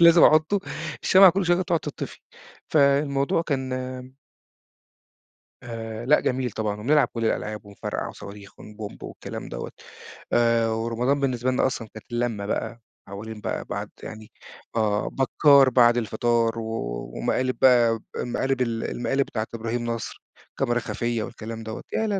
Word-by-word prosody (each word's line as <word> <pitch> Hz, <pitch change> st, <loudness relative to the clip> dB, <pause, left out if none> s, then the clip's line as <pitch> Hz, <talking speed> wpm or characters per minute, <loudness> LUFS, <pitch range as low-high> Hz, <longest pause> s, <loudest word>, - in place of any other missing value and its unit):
لازم 170 Hz, 0 st, +8 dB
أحطه 155 Hz, +6 st, +5 dB, 0.4 s
الشمعة 190 Hz, 0 st, +8 dB
كل 185 Hz, +1 st, -1 dB
شوية 175 Hz, -, +4 dB
كانت 185 Hz, +2 st, -2 dB
تقعد 170 Hz, -3 st, +2 dB
تطفي 150 Hz, -, -6 dB, 0.5 s
فالموضوع 140 Hz, 0 st, +3 dB
كان 135 Hz, -5 st, -2 dB, 1.9 s
آآ، 115 Hz, -1 st, -6 dB
لأ 150 Hz, +4 st, +5 dB
جميل 125 Hz, -1 st, -1 dB
طبعًا، 105 Hz, -1 st, -3 dB
وبنلعب 145 Hz, +7 st, +3 dB
كل 115 Hz, -1 st, -3 dB
الألعاب 105 Hz, -1 st, -2 dB
ونفرقع 100 Hz, 0 st, -5 dB
صواريخ 100 Hz, 0 st, -11 dB
ون 105 Hz, -, -12 dB
بومب 105 Hz, -1 st, -8 dB
والكلام -, -, -7 dB
دوّة -, -, -6 dB, 0.6 s
آآ، 115 Hz, -1 st, +3 dB
ورمضان 115 Hz, +5 st, 0 dB
بالنسبة 130 Hz, -2 st, 0 dB
لنا 130 Hz, -, +2 dB
أصلًا 115 Hz, -3 st, -4 dB
كانت 110 Hz, -, -11 dB
اللمة 120 Hz, -4 st, -1 dB
بقى 115 Hz, +3 st, -3 dB, 0.3 s
حولين 105 Hz, +2 st, -8 dB
بقى -, -, -3 dB
بعد -, -, -4 dB
يعني 110 Hz, 0 st, -9 dB, 0.4 s
آه، 105 Hz, -2 st, +1 dB
بكار 135 Hz, 0 st, +5 dB
بعد 120 Hz, -1 st, +5 dB
الفطار، 115 Hz, +1 st, +1 dB
و 110 Hz, 0 st, -4 dB, 0.4 s
ومقالب 130 Hz, -, 0 dB
بقى 120 Hz, -3 st, +5 dB, 0.2 s
المقالب 130 Hz, +2 st, -1 dB
ال 115 Hz, -2 st, -1 dB
المقالب 135 Hz, +3 st, 0 dB
بتاعة 110 Hz, -1 st, -3 dB
إبراهيم 115 Hz, +1 st, -3 dB
نصر 115 Hz, -1 st, -4 dB, 0.3 s
الكاميرا 120 Hz, -3 st, 0 dB
الخفية 120 Hz, -1 st, -2 dB
والكلام 115 Hz, -1 st, -7 dB
دوّة، 110 Hz, 0 st, -6 dB
يا 220 Hz, -, +1 dB
لا، 200 Hz, -2 st, 0 dB
120 Hz, 145 wpm, -25 LUFS, 110-135 Hz, 1.9 s, لازم